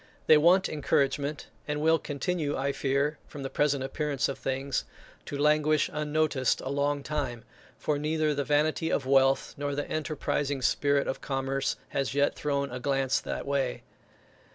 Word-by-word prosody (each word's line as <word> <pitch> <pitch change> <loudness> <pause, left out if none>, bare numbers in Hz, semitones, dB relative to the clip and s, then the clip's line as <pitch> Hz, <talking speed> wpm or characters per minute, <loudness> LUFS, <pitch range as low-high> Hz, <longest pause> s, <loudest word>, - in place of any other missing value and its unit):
They 155 - +7
want 175 +5 +5
encouragement, 145 0 0 0.2
and 150 0 -1
will 160 +1 +3
continue, 150 0 -2
I 140 +1 0
fear, 140 +2 0
from 145 - -8
the 135 - -4
present 145 -2 +1
appearance 140 -1 -1
of 135 - -5
things, 135 0 -2 0.4
to 145 - -4
languish 150 +1 +3
unnoticed 150 -3 +1
a 130 - -5
long 140 0 0
time; 135 -6 -3 0.3
for 150 -1 -1
neither 155 0 +1
the 140 0 -1
vanity 155 +3 +1
of 135 - 0
wealth, 135 0 +3
nor 145 0 -2
the 145 - -3
enterprising 145 -3 -2
spirit 140 +1 +2
of - - -3
commerce, 135 0 -1
has 135 -1 -2
yet 145 0 +3
thrown 140 -2 -2
a 125 - -4
glance 135 0 +1
that - - -5
way. 140 -3 -1
145 Hz, 160 wpm, -28 LUFS, 135-150 Hz, 0.4 s, They